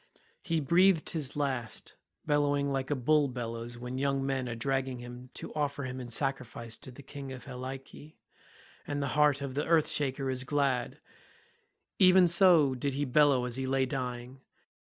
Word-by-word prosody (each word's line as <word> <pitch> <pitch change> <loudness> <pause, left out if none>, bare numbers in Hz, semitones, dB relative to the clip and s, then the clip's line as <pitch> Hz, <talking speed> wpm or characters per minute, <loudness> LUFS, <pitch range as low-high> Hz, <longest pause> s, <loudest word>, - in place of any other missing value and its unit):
He 165 -1 0
breathed 170 +3 +3
his 145 -4 -3
last, 130 -6 -3 0.3
bellowing 145 -1 +1
like 135 -1 -2
a 145 - +1
bull 145 +3 +3
bellows 120 -1 -5
when 125 +2 -5
young 135 -1 0
men 135 -2 -1
are 120 - -4
dragging 130 +1 -1
him 120 +1 -10
to - - -7
offer 145 -2 -2
him 130 0 -5
in 125 -1 -7
sacrifice 120 -3 -3
to - - -10
the 130 +3 -12
King 135 0 -8
of 130 -1 -8
Helice, 135 +3 -8 0.7
and 145 0 -2
the 140 - -1
heart 150 -2 +3
of 140 -2 -4
the 145 +2 -1
earth 160 -2 +4
shaker 135 -2 -1
is 130 0 -2
glad; 135 -3 0 1.0
even 185 -1 +7
so 170 -5 +5
did 130 +2 -2
he 145 +1 0
bellow 135 -1 +4
as 125 0 -3
he 135 0 -2
lay 135 0 +2
dying. 125 0 -5
135 Hz, 175 wpm, -30 LUFS, 125-145 Hz, 1.0 s, even